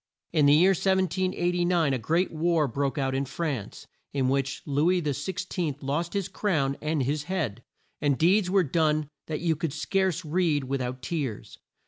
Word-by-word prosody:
In 150 -3 +4
the 145 - +7
year 180 +5 +6
1789, 180 -3 +1
a 130 - 0
great 165 - +1
war 160 -1 +1
broke 135 +1 -2
out 135 -1 0
in 135 +1 0
France, 135 -7 -4 0.3
in 135 -2 +1
which 135 0 -1
Lou 145 +3 +2
is 180 -1 +2
XVI 160 +2 -2
lost 155 +5 -2
his 200 -3 -1
crown 165 -8 0
and 150 -2 0
his 145 +3 -1
head, 155 - -2 0.4
and 145 -3 +2
deeds 180 +3 +3
were 190 0 +4
done 155 -1 +1 0.2
that 155 -1 -3
you 165 -2 +1
could 155 -1 -3
scarce 190 -3 0
read 155 -2 +1
of 130 - -9
with 135 -1 -1
out 125 +1 -4
tears. 145 - -4
155 Hz, 175 wpm, -27 LUFS, 140-180 Hz, 0.4 s, the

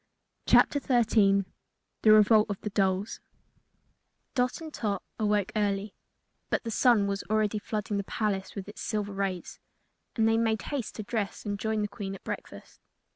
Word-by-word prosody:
CHAPTER 285 - +5
13 215 -7 +3 0.6
The 215 - +6
Revolt 215 0 +6
of 200 - -3
the 210 - -4
Dolls 195 +1 0 1.1
Dot 250 -1 0
and 320 -2 -8
Tot 205 -4 -2 0.2
awoke 210 -1 +1
early, 205 -1 0 0.6
but - - 0
the 230 - -4
sun 230 -3 +4
was 200 0 -2
already 215 -1 +1
flooding 210 0 -3
the 200 - -1
palace 195 -2 -2
with 200 -2 -6
its 210 - -9
silver 210 -2 -2
rays, 195 -3 -3 0.6
and 225 -2 +3
they 225 0 +3
made 220 -1 0
haste 275 -6 -4
to 215 - -5
dress 210 -1 -3
and 205 -1 -3
join 220 0 -1
the - - 0
Queen 200 -1 -6
at - - -13
breakfast. - - -8
210 Hz, 165 wpm, -28 LUFS, 200-220 Hz, 1.1 s, The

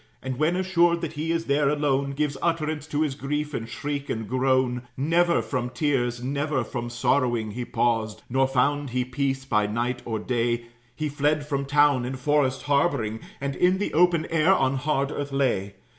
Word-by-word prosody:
And 130 -1 -4
when 155 +3 +2
assured 175 -2 +2
that 165 -2 -4
he 160 +2 -2
is 165 0 -1
there 140 0 +2
alone, 140 -2 0
Gives 145 0 -1
utterance 155 -3 -1
to 155 0 0
his 150 -3 -1
grief 150 +2 -3
in 115 -3 -3
shriek 140 +3 -4
and 110 -1 -3
groan. 130 0 +1 0.2
Never 170 +5 +2
from 125 -3 -2
tears, 125 -3 -1
never 140 0 -1
from 120 +1 -5
sorrowing, 120 -2 +1
He 120 +3 -4
paused; 110 -3 0
nor 135 +2 +2
found 140 +2 +1
he 125 +1 -1
peace 135 +1 -2
by 105 -5 +1
night 120 +3 -2
or 110 -2 -3
day; 120 +1 -1 0.3
He 155 +2 -2
fled 145 +1 0
from 140 -2 -2
town, 145 -2 +3
in 130 +2 -3
forest 130 -1 +1
harboring, 140 -6 +1 0.2
And 140 0 -3
in 180 +1 +3
the 205 - -2
open 170 -1 +3
air 165 +2 +4
on 135 -4 +1
hard 140 0 0
earth 145 -1 -4
lay. 120 -8 0
140 Hz, 185 wpm, -25 LUFS, 125-150 Hz, 0.3 s, air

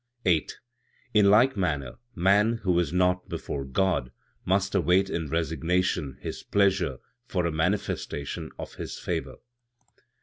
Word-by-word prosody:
8. 85 -5 +1 0.6
"In 105 -2 +5
like 120 +6 +5
manner, 75 - -2 0.2
man, 100 +5 +4
who 90 -3 +2
is 85 -4 0
naught 90 0 +1
before 70 - -4
God, 65 -2 0 0.3
must 100 +2 +1
await 95 +1 +3
in 80 -3 -2
resignation 80 -1 0
His - - -5
pleasure 100 -1 +1 0.3
for 90 -5 -1
a 85 - 0
manifestation 80 -3 -2
of - - -7
His - - -6
favor. - - -3
90 Hz, 130 wpm, -27 LUFS, 80-100 Hz, 0.6 s, In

